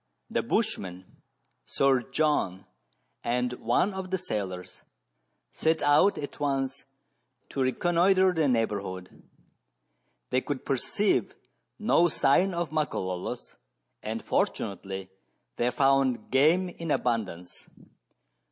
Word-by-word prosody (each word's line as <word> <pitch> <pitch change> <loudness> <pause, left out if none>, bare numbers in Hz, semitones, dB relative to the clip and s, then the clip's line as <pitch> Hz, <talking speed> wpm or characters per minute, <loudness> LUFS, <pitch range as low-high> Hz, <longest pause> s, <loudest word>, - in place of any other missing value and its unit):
The - - +1
bushman, 100 - -2 0.6
Sir 135 -2 +3
John, 135 - 0 0.6
and 125 +1 0
one 190 +9 +1
of 190 -1 -5
the 190 - 0
sailors 100 - -5 0.7
set 160 0 0
out 145 +8 +4
at 145 - -6
once 135 -1 -1 0.6
to 135 - -3
reconnoitre 175 +7 +3
the 160 -3 +2
neighbourhood. 100 -6 -2 1.1
They 130 - +2
could 145 -1 -4
perceive 195 +10 0 0.4
no 210 -5 +4
sign 170 +5 +2
of 170 -2 -2
Makololos, 95 - -3 0.5
and - - -5
fortunately 95 -1 -2 0.5
they 120 - +2
found 135 -3 +2
game 160 +8 +4
in 165 -2 -7
abundance. 105 - -2
135 Hz, 100 wpm, -28 LUFS, 110-170 Hz, 1.1 s, out